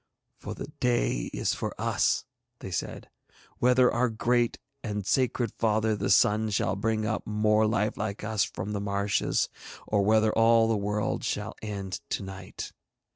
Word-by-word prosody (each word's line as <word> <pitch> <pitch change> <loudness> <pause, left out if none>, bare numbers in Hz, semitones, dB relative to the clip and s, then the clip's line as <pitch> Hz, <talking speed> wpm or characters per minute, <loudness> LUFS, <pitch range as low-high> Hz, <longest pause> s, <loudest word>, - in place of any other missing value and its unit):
'For - - -6
the - - -6
day 120 - +1
is - - 0
for - - -5
us,' - - +1 0.3
they - - -8
said, - - -4 0.5
'whether 125 0 +4
our 125 +1 +2
great 120 +1 +1 0.3
and 105 -3 -3
sacred 120 0 +1
father 110 0 +2
the 100 -1 -2
Sun 110 +1 +4
shall 95 -1 0
bring 110 +1 0
up 110 0 -2
more 105 0 +3
life 105 -1 0
like 105 -1 -3
us 110 -1 +1
from 95 +3 -4
the 100 - -2
marshes, 100 0 0 0.4
or 105 -2 +1
whether 110 +1 +3
all 115 0 +5
the 115 - +2
world 105 +1 -1
shall 105 +1 -2
end 100 -4 -5
to - - -2
night.' 95 -1 -7
110 Hz, 160 wpm, -28 LUFS, 100-115 Hz, 0.5 s, all